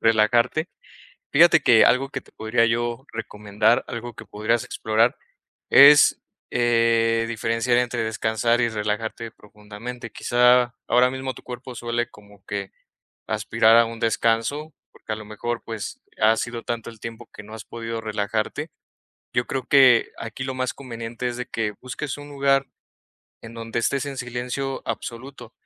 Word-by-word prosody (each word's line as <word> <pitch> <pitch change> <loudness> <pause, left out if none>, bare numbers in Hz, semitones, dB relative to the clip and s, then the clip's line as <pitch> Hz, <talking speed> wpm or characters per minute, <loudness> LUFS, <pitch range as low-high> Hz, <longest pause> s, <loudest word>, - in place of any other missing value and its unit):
relajarte, 115 +8 +2 0.6
fíjate 170 +4 +6
que 115 -2 +6
algo 130 +3 +2
que 135 - -4
te - - -22
podría 115 +1 +1
yo 120 +3 -2
recomendar, 105 0 0
algo 120 0 -6
que - - -11
podrías 110 +3 -1
explorar, 110 +2 +1 0.5
es, 145 +1 +8 0.3
eh, 115 -1 +2
diferenciar 115 +1 0
entre 120 -1 0
descansar 110 +1 0
y 120 - +2
relajarte 110 +1 -3
profundamente, 105 +3 -10
quizá 125 0 +3
ahora 125 +1 +4
mismo 130 0 -4
tu - - -14
cuerpo 125 0 -8
suele 120 +1 -2
como 100 -1 -18
que 100 -2 -5 0.6
aspirar 110 +1 +3
a 115 - +6
un 115 0 -7
descanso 115 +7 0 0.2
porque - - -10
a - - -3
lo 110 - -9
mejor, 115 +3 -4
pues, 110 -3 -6 0.2
ha 110 +1 +5
sido 120 -1 -4
tanto 115 -1 -4
el 115 -2 -14
tiempo 115 +1 -9
que 105 - -11
no 110 - -12
has 110 -1 -9
podido 115 -1 -5
relajarte, 110 +7 -3 0.6
yo 120 - +1
creo 135 -1 -3
que 130 -4 +5
aquí 115 +3 -6
lo 130 0 -4
más 130 -1 -2
conveniente 120 -2 -5
es 120 - -5
de 125 - -4
que 110 -2 -2
busques 130 +3 -5
un 145 0 -10
lugar 135 -1 +2 0.8
en 115 - -10
donde 115 0 -4
estés 135 +3 0
en 140 -1 -6
silencio 125 +2 -4
absoluto, 120 -1 -7
115 Hz, 155 wpm, -23 LUFS, 110-125 Hz, 0.8 s, es